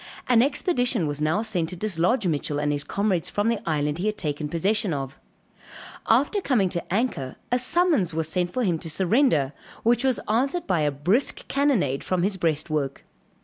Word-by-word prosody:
An 240 -2 +5
expedition 250 - +1
was 145 0 -3
now 160 +8 +1
sent 180 -8 -1
to 185 - -6
dislodge 195 +4 0
Mitchell 150 -3 -1
and 145 0 0
his 145 0 -1
comrades 185 -1 0
from 205 +2 0
the 230 -2 0
island 150 0 0
he 195 - -1
had 215 0 -1
taken 150 -2 -3
possession 190 +2 0
of; 135 +1 -6 0.9
after 280 - +3
coming 225 - +2
to 170 -1 -5
anchor, 190 - -1 0.2
a 245 - +3
summons 290 - +2
was 160 -1 -2
sent 175 +2 -1
for 255 - -1
him 175 -6 +1
to 165 - -6
surrender, 175 - +2 0.3
which 240 +2 +3
was 260 -3 +2
answered 270 +10 0
by 185 -4 +1
a 150 -1 +2
brisk 175 - 0
cannonade 240 - +1
from 185 -2 0
his 200 +1 0
breastwork. 155 -5 -1
185 Hz, 185 wpm, -25 LUFS, 155-235 Hz, 0.9 s, An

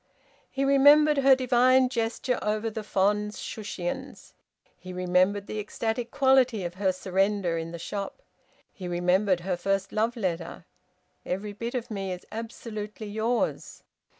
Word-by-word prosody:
He 275 0 -1
remembered 290 +2 +6
her 270 -1 +6
divine 255 0 +4
gesture 240 0 -1
over 215 +1 -1
the 220 - -4
fond 210 +1 +1
Shushions. 200 -5 -6 0.4
He 185 0 -10
remembered 185 +3 +1
the 215 - -5
ecstatic 225 +3 -3
quality 260 -6 +3
of 175 0 -4
her 190 +1 +1
surrender 190 -1 0
in 165 0 -4
the 170 - -6
shop. 200 - -6 0.5
He 185 - -7
remembered 180 +1 +2
her 185 +1 -1
first 195 +2 -1
love 225 +3 0
letter: 175 -4 -3 0.6
"Every 200 +3 -4
bit 235 +4 -5
of 245 -1 -4
me 195 -2 -3
is 180 - -9
absolutely 215 -1 -6
yours." 220 +3 -2
210 Hz, 140 wpm, -27 LUFS, 185-235 Hz, 0.6 s, remembered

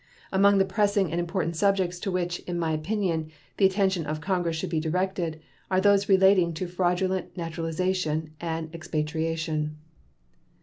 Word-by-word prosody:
Among 200 +1 +5
the 195 - +4
pressing 200 -2 +1
and 170 - -1
important 170 -1 -1
subjects 190 -1 +1
to 195 - -3
which, 175 -1 -1
in 175 -1 -2
my 165 -2 0
opinion, 160 0 -1 0.3
the 195 - +6
attention 190 -4 0
of 155 +1 -2
Congress 175 0 -1
should 170 +2 -4
be 160 - +1
directed 170 0 -1 0.3
are 185 - +3
those 200 0 +3
relating 190 -3 +5
to 185 - -3
fraudulent 180 +1 -1
naturalization 165 -1 -2
and 165 -1 -4
expatriation. 155 -1 -2
175 Hz, 145 wpm, -26 LUFS, 160-190 Hz, 0.3 s, the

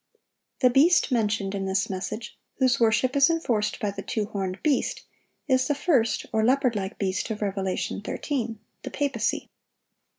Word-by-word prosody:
"The 250 - +5
beast" 295 +4 +4
mentioned 205 -4 0
in 195 -1 -2
this 190 0 0
message, 210 +4 -5 0.2
whose 255 -3 +2
worship 235 +4 +2
is 280 +2 +5
enforced 240 -11 0
by 205 - -1
the 200 0 -6
two 215 +1 -2
horned 190 -2 -4
beast, 295 -3 0 0.4
is 260 -2 +3
the 290 - +1
first, 270 -7 +1
or 220 0 +2
leopard 255 0 +3
like 195 +1 -3
beast 190 +1 -1
of 215 -1 -3
Revelation 195 -1 -2
13,—the 225 -2 -5
papacy. 285 -2 -1
225 Hz, 155 wpm, -26 LUFS, 200-260 Hz, 0.4 s, The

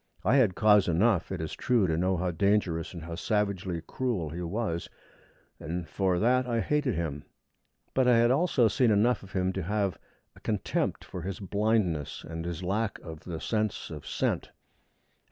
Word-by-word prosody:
I 135 - +5
had 110 -9 +4
cause 105 -2 +5
enough, 90 +2 +2
it 95 - -3
is 80 - -4
true, 120 -5 +2
to 80 -3 +1
know 90 +3 +1
how 90 +1 0
dangerous 95 -2 +1
and 85 - -7
how 85 +1 -6
savagely 95 -2 -1
cruel 115 -12 -2
he 85 +2 -5
was, 85 -1 -2 0.7
and 85 +2 -4
for 95 +2 0
that 125 +5 +2
I 115 -1 0
hated 145 -2 +1
him. 80 -4 -3 0.7
But 130 -1 +3
I 125 -2 +6
had 120 +1 +4
also 135 -4 +3
seen 125 +3 +2
enough 110 +4 +3
of 100 0 -13
him 95 0 0
to 95 - -2
have 100 +1 -1 0.4
a - - -15
contempt - - -1
for 90 - -7
his 95 +4 -5
blindness 100 -6 0
and 80 +1 -5
his 85 +1 -4
lack 100 +4 -1
of 80 -2 -9
the 85 -3 -5
sense 110 -3 -2
of 75 -2 -8
scent. - - -1
95 Hz, 180 wpm, -29 LUFS, 85-115 Hz, 0.7 s, I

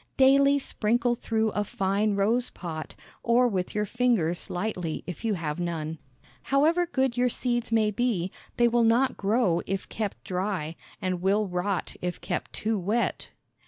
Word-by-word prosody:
Daily 275 +1 +6
sprinkle 240 -2 0
through 225 -2 0
a 210 0 -1
fine 200 +1 0
rose 225 +5 +1
pot, 160 -3 -7 0.3
or 240 +1 +4
with 190 -5 -2
your 210 0 +1
fingers 210 -8 0
lightly 180 -4 -3
if 180 +4 -7
you 220 -3 +1
have 160 -2 -3
none. 160 -2 -3 0.4
However 315 - +2
good 265 -6 0
your 250 0 +3
seeds 240 -1 -1
may 220 -2 +3
be, 200 -5 0 0.3
they 240 - +5
will 235 0 +3
not 235 +4 +3
grow 200 -4 +2
if 195 +1 -2
kept 215 -3 -4
dry, 180 -4 -2 0.2
and 185 -3 -2
will 200 +3 +2
rot 180 +1 -2
if 180 0 -3
kept 180 - -3
too 220 -1 -1
wet. 210 +6 -1
210 Hz, 160 wpm, -27 LUFS, 180-240 Hz, 0.4 s, Daily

